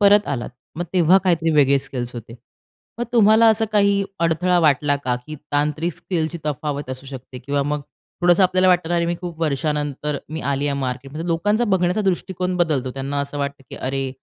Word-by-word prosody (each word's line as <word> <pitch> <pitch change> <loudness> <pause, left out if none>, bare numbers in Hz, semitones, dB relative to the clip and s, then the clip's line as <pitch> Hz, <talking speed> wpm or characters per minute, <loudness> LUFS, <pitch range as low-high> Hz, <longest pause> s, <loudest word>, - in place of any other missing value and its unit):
परत 205 0 +5
आलात, 130 -4 -3 0.3
मग 175 - -2
तेव्हा 180 +1 +5
काहीतरी 165 -2 +2
वेगळे 140 -2 +4
स्किल्स 125 -2 -5
होते. 115 0 -8 0.6
मग 240 - -1
तुम्हाला 220 0 +6
असं 220 0 +3
काही 200 -1 +3 0.2
अडथळा 170 +2 +2
वाटला 145 -2 +3
का 125 -3 -2
की 155 - -6 0.2
तांत्रिक 150 +3 0
स्किलची 170 -1 -3
तफावत 145 -1 -3
असू 130 +1 -7
शकते 130 -1 -9
किंवा 140 +3 -1
मग 145 +1 -2 0.4
थोडंसं 175 +2 +4
आपल्याला 185 0 +3
वाटतं 180 -2 +3
ना, 175 - 0
"अरे 170 0 +1
मी 175 - 0
खूप 170 -2 -7
वर्षानंतर 150 -1 -1 0.2
मी 160 - -3
आली 140 +1 -1
आहे 140 -1 -1
मार्केट" 130 +1 -4
म्हणजे 165 +3 -5
लोकांचा 205 +8 +1
बघण्याचा 190 -1 +1
दृष्टिकोन 185 -1 -1
बदलतो. 145 -7 0
त्यांना 135 +1 -3
असं 140 +1 -4
वाटतं 140 -1 -3
की - - -7
अरे 135 0 -2
155 Hz, 190 wpm, -21 LUFS, 140-180 Hz, 0.6 s, तुम्हाला